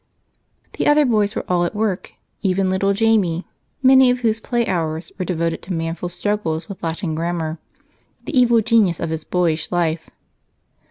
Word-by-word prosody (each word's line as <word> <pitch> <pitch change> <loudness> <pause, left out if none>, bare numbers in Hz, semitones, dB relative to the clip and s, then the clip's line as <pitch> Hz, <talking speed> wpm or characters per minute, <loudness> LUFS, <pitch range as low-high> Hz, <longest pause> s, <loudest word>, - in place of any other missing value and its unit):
The - - +1
other 295 0 +5
boys 215 -4 +1
were - - -3
all 175 -1 +1
at 175 - -2
work, 210 -3 -2 0.3
even 190 -1 +1
little 195 +1 +1
Jamie, 200 -5 +1 0.4
many 260 0 +7
of 250 0 0
whose 225 -2 +2
play 240 0 -1
hours 160 -3 -2
were 185 - -1
devoted 165 -2 -2
to 185 - -5
manful 165 +1 -3
struggles 175 -2 -2
with 195 -3 -9
Latin 165 +1 -3
grammar, 165 -1 -3 0.7
the 305 - -4
evil 240 -2 +5
genius 215 -6 +2
of 165 - -3
his 160 -1 -3
boyish 165 -2 -1
life. 170 -2 -1
185 Hz, 165 wpm, -20 LUFS, 165-220 Hz, 0.7 s, many